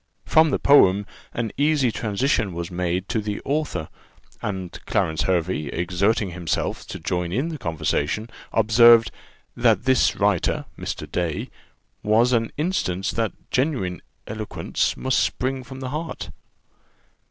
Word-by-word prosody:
From 160 0 +5
the - - +1
poem, 100 -8 +5 0.3
an 115 -2 -3
easy 145 -4 +3
transition 105 -1 0
was 85 0 -5
made 90 +1 -1
to 110 - 0
the 105 -1 -3
author; 145 - -1 0.5
and 95 -3 -4
Clarence 80 -1 0
Hervey, 85 -4 0
exerting 95 - 0
himself 85 -2 -2
to - - -6
join 90 -1 -2
in 130 - -1
the 155 -3 -6
conversation, 80 +2 -1 0.2
observed, 115 +1 +6 0.4
"that 115 -4 +3
this 130 0 +3
writer - - +1
(Mr. - - -5
Day) 85 -4 -2 0.5
was 115 +4 +3
an 115 -1 +1
instance 110 - -1
that 115 -2 -1 0.2
genuine 125 - 0 0.2
eloquence 105 0 -2
must 130 0 +1
spring 130 0 -1
from 130 +1 -10
the 130 - -4
heart. 155 +4 -5
110 Hz, 130 wpm, -23 LUFS, 90-130 Hz, 0.5 s, observed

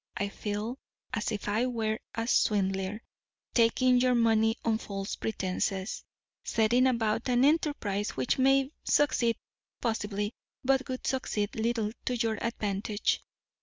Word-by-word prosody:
I 200 - -1
feel 210 +5 -4 0.3
as 210 - -1
if 210 -1 -4
I 220 +5 +1
were 220 -3 -1 0.2
a 225 0 -1
swindler, 195 -2 +1 0.5
taking 250 +2 +4
your 250 -1 +3
money 225 -1 +3
on 225 -1 +2
false 195 -3 -4
pretences; 190 -1 -2 0.4
setting 235 +3 +3
about 230 -1 0
an 250 +1 +4
enterprise 285 -10 +1
which 130 - 0
may 270 +1 +4
succeed, 250 -5 +2 0.4
possibly, 210 -2 -2 0.3
but 270 0 +2
would 255 0 -4
succeed 215 -6 -1
little 225 -1 0
to 250 - 0
your 225 -2 -1
advantage. 210 -2 -1
225 Hz, 130 wpm, -29 LUFS, 205-250 Hz, 0.5 s, taking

